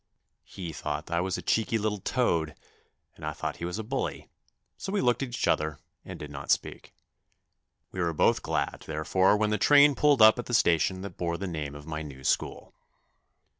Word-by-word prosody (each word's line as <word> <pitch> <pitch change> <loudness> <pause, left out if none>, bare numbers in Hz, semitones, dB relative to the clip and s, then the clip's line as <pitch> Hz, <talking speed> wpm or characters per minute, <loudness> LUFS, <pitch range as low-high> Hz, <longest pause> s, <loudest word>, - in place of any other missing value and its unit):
He 85 -4 -7
thought - - -5
I 85 0 +1
was 95 0 -2
a - - -7
cheeky 115 0 +1
little 105 -1 -1
toad 85 - 0 0.6
and - - -15
I 75 0 -3
thought - - -4
he 85 - -5
was 90 +3 -4
a 110 - -4
bully, 130 +5 -4 0.4
so 195 - -6
we 205 - 0
looked 120 - +2
at 135 - -2
each 120 - -2
other 75 -1 +1 0.3
and - - -8
did 75 -1 -8
not 70 0 -8
speak. - - -1 1.0
We 95 - -4
were 85 -1 +1
both 80 - +2
glad, - - -2
therefore, 95 +6 +2
when 105 0 +1
the 105 - 0
train 145 +4 +6
pulled 140 -4 +4
up 110 +2 +7
at 120 - -5
the 120 - 0
station 95 0 +2
that 100 - -8
bore 85 -1 -2
the 100 - -4
name 75 -5 -4
of 75 0 -10
my 75 -1 -4
new 70 -4 -9
school. - - -1
95 Hz, 205 wpm, -28 LUFS, 80-110 Hz, 1.0 s, up